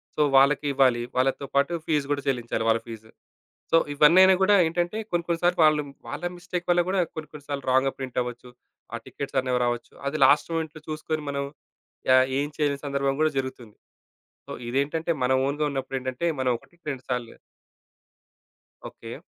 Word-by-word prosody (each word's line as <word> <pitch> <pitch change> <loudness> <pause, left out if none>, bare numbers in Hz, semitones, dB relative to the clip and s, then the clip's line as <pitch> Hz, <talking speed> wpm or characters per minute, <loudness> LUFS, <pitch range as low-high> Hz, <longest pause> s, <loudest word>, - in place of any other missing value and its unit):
So, - - 0 0.2
వాళ్ళకి 140 +2 +4
ఇవ్వాలి. 130 -3 +3 0.2
వాళ్ళతో 135 +2 +1
పాటు 140 +5 +2
ఫీస్ 150 -3 +1
కూడా 140 - 0
చెల్లించాలి 120 -4 -1
వాళ్ళ 115 0 +2
ఫీసు. 110 -1 -10 0.6
సో, - - +6 0.2
ఇవన్నీ 150 +5 +6
అయినా 190 0 +6
కూడా 205 +1 +5
ఏంటంటే 175 +5 -1
కొన్ని, 170 -1 0
కొన్ని 170 0 -1
సార్లు 175 0 +2
వాళ్ళు 155 -1 +3 0.3
వాళ్ళ - - -6
మిస్టేక్ 175 0 -5
వల్ల 175 0 +4
కూడా 190 -1 +2
కొన్ని, 155 -2 -7
కొన్ని 150 -2 -11
సార్లు 140 -1 -4
రాంగ్‌గా 130 +1 +3
ప్రింటఅవ్వొచ్చు. 125 -2 -4 0.4
ఆ - - -2
టికెట్సనేవి 130 -2 -2
రావొచ్చు, 120 -1 -3
అది 155 +2 -2
లాస్ట్ 145 +5 +4
మొమెంట్‌లో 160 -1 -4
చూసుకొని 155 0 -3
మనం, 140 0 -2 0.7
యా 130 - +8 0.2
ఏం 145 - 0
చేయలేని 145 -2 -1
సందర్భం 140 -1 0
కూడా 155 0 +3
జరుగుతుంది. 130 -5 -5 0.7
సో, - - -8 0.2
ఇదేంటంటే 150 +6 -1
మన 125 - +1 0.2
ఓన్‌గా 150 +2 -1
ఉన్నప్పుడేంటంటే 130 +1 -3 0.2
మనం 130 - +2
ఒకటికి 170 +6 -26
రెండు 130 -1 -7
సార్లు 125 -2 -2 1.6
ఓకే. - - -10
140 Hz, 160 wpm, -25 LUFS, 130-160 Hz, 1.6 s, యా